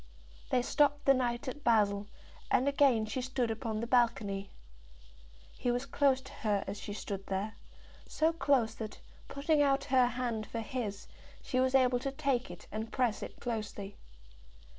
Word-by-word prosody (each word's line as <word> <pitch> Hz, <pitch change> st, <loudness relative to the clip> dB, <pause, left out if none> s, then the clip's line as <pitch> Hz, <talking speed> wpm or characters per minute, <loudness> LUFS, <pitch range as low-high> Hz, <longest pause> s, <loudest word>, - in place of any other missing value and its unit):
They 250 Hz, -, +2 dB
stopped 290 Hz, +2 st, +2 dB
a 275 Hz, -, +8 dB
night 245 Hz, -2 st, -1 dB
at 285 Hz, +3 st, -5 dB
Basle, 205 Hz, -3 st, +3 dB, 0.4 s
and 260 Hz, -, +3 dB
again 275 Hz, -6 st, +4 dB
she 220 Hz, +4 st, -3 dB
stood 250 Hz, -2 st, -1 dB
upon 220 Hz, 0 st, -3 dB
the -, -, -1 dB
balcony. 230 Hz, -5 st, +1 dB, 1.1 s
He 245 Hz, -, -2 dB
was 245 Hz, +2 st, 0 dB
close 275 Hz, -2 st, +2 dB
to -, -, -12 dB
her 210 Hz, -3 st, 0 dB
as 200 Hz, +1 st, -5 dB
she 205 Hz, -, -6 dB
stood 200 Hz, -1 st, -5 dB
there, 195 Hz, +3 st, -2 dB, 0.5 s
so 320 Hz, +2 st, +1 dB
close 270 Hz, -8 st, +2 dB
that, 220 Hz, -1 st, -7 dB, 0.3 s
putting 290 Hz, +2 st, +1 dB
out 275 Hz, -1 st, +3 dB
her 255 Hz, -2 st, +6 dB
hand 240 Hz, -3 st, -2 dB
for 230 Hz, -, -4 dB
his, 215 Hz, -3 st, -4 dB, 0.4 s
she 255 Hz, -, -1 dB
was 260 Hz, +1 st, +2 dB
able 250 Hz, -2 st, +4 dB
to 275 Hz, +2 st, -3 dB
take 270 Hz, -3 st, 0 dB
it 175 Hz, -, -10 dB
and 220 Hz, +1 st, -4 dB
press 245 Hz, -5 st, 0 dB
it -, -, -8 dB
closely. 210 Hz, -4 st, -4 dB
245 Hz, 165 wpm, -32 LUFS, 215-265 Hz, 1.1 s, a